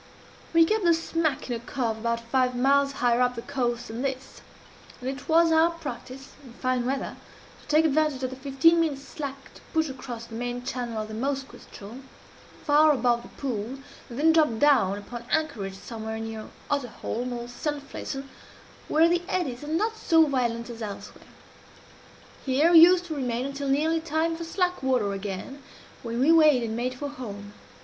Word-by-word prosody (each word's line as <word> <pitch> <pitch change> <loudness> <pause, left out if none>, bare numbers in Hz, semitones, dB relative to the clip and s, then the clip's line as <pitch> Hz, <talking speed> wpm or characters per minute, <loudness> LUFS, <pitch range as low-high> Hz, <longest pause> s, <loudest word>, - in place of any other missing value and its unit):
"We 330 -1 +6
kept 430 +4 0
the 340 -1 +5
smack 325 -3 -1
in 245 - -2
a - - -4
cove 230 -1 -3
about 235 +1 -1
five 250 +1 +1
miles 275 +2 +3
higher 245 -2 +2
up 250 0 +2
the 230 - -6
coast 245 -4 -2
than 225 +2 -5
this; 265 -1 -4 0.6
and 250 - -6
it 270 +3 -5
was 330 +1 +5
our 320 +1 +5
practice, 270 -4 -8
in 250 -3 -13
fine 255 0 -1
weather, 270 +1 -3 0.4
to - - -20
take 305 +2 +4
advantage 300 -3 +1
of 255 - -1
the - - -6
fifteen 275 +5 +3
minutes' 290 -4 0
slack 275 -2 -7
to - - -16
push 320 -2 +1
across 250 -3 -7
the 230 - -13
main 245 +1 -4
channel 240 -4 -3
of - - -8
the 215 - -8
Moskoe 270 +4 -3
ström, 215 +6 -11 0.6
far 300 +1 +5
above 245 -3 +2
the - - -12
pool, 245 -1 -4 0.3
and 235 - -8
then 320 +3 +4
drop 305 -8 +3
down 245 -9 +4
upon 235 +4 -8
anchorage 215 -12 -1
somewhere 220 0 -6
near 225 -1 -6 0.2
Otterholm, 250 -2 -2
or 240 -1 -5
Sandflesen, 275 +1 -5 0.6
where 320 +2 +4
the 345 0 +2
eddies 285 -9 -2
are - - -7
not 430 +9 0
so 325 -6 +4
violent 240 -5 -1
as 230 0 -9
elsewhere. 205 -2 -8 1.2
Here 285 +5 +3
we 335 - +9
used 355 +2 +7
to 320 -3 -5
remain 250 -2 -2
until 275 0 -4
nearly 315 +4 +2
time 325 +1 -1
for 335 0 -6
slack 360 +1 -1
water 250 -7 +1
again, 195 +8 -6 0.4
when 235 0 -4
we 280 +5 +5
weighed 305 -6 +6
and 225 -1 -3
made 250 +2 -2
for 285 +3 -4
home. 205 -7 -8
265 Hz, 185 wpm, -26 LUFS, 235-310 Hz, 1.2 s, we